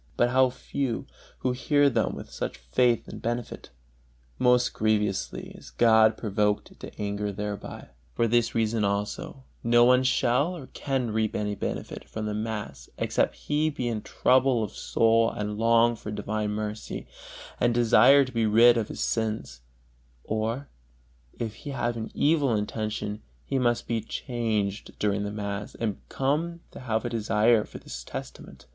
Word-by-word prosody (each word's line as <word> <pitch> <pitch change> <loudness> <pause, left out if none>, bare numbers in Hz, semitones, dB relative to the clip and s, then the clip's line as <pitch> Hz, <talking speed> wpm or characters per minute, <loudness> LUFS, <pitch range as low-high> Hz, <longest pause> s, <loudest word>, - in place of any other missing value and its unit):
but 120 0 +3
how 130 0 +5
few 125 -1 -3 0.4
who 130 - +1
hear 145 +3 +3
them 135 - +1
with - - -8
such - - -4
faith 115 - +1
and - - -9
benefit! 120 0 -4 0.7
Most 125 -1 +3
grievously 105 -2 -1
is - - -12
God 110 -1 +4
provoked 105 -1 -1
to - - -10
anger 105 0 -2
thereby. 105 0 -6 0.3
For 115 - +2
this 115 0 +1
reason 115 -1 +1
also 100 +6 -2 0.2
no 120 +1 +5
one 125 +1 +5
shall 130 +6 +2
or 140 - -9
can 130 -5 -1
reap 110 0 0
any 105 0 -1
benefit - - -5
from 110 -1 -4
the 105 - -2
mass 110 0 -5
except - - 0
he 150 +2 +1
be 130 -5 -3
in 110 -3 -2
trouble 130 -1 +2
of 105 - -4
soul 115 0 +2
and 105 0 -4
long 115 +1 +4
for 105 - -8
divine 105 0 -2
mercy, 105 0 -4 0.5
and 120 - +3
desire 120 +4 +6
to 130 - -9
be 115 -2 +1
rid 120 +3 +6
of 110 -2 -1
his - - -6
sins; 110 - -2 0.6
or, 115 +6 -2 0.7
if 115 -3 -3
he - - -8
have 120 -3 -1
an 110 -1 -5
evil 145 -6 +3
intention, 105 0 -3 0.2
he 135 - 0
must 120 -2 +1
be 115 -1 -1
changed 110 -3 -3
during 100 -1 0
the 105 - -3
mass, 105 -1 -5
and 110 -4 -2
come 160 +5 -1
to - - -10
have 115 -3 -2
a - - -1
desire 110 0 +3
for - - -10
this - - -8
testament. - - -9
115 Hz, 160 wpm, -27 LUFS, 105-125 Hz, 0.7 s, desire